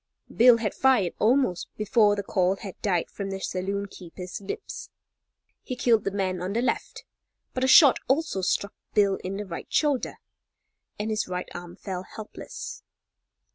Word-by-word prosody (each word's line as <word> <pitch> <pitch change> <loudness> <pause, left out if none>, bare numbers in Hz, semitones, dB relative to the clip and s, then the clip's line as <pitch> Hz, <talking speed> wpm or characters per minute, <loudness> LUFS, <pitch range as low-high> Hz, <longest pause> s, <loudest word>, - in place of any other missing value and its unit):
Bill 240 0 +7
had 220 -3 -2
fired 250 -10 +3
almost 225 -6 +2
before 210 0 +3
the 200 - -3
call 185 -1 +1
had 195 -2 -8
died 180 -5 0
from 200 -1 -5
the 195 0 -4
saloon 195 +2 -2
keeper's 180 -1 -9
lips. 460 - -6 0.7
He 255 - -5
killed 230 -4 +3
the - - +2
man 190 -2 -1
on 185 +2 -3
the 235 - +1
left, - - -2 0.5
but 255 - -2
a - - +3
shot 275 0 +8
also 270 -7 +1
struck 200 +2 0 0.2
Bill 200 -2 +4
in 190 +1 -3
the 205 - -4
right 170 -3 -7
shoulder, 290 -4 +1 0.8
and 215 +1 -2
his 215 -1 -1
right 180 0 -4
arm 175 0 -8
fell 185 -3 -5
helpless. 365 - -8
200 Hz, 165 wpm, -26 LUFS, 185-240 Hz, 0.8 s, shot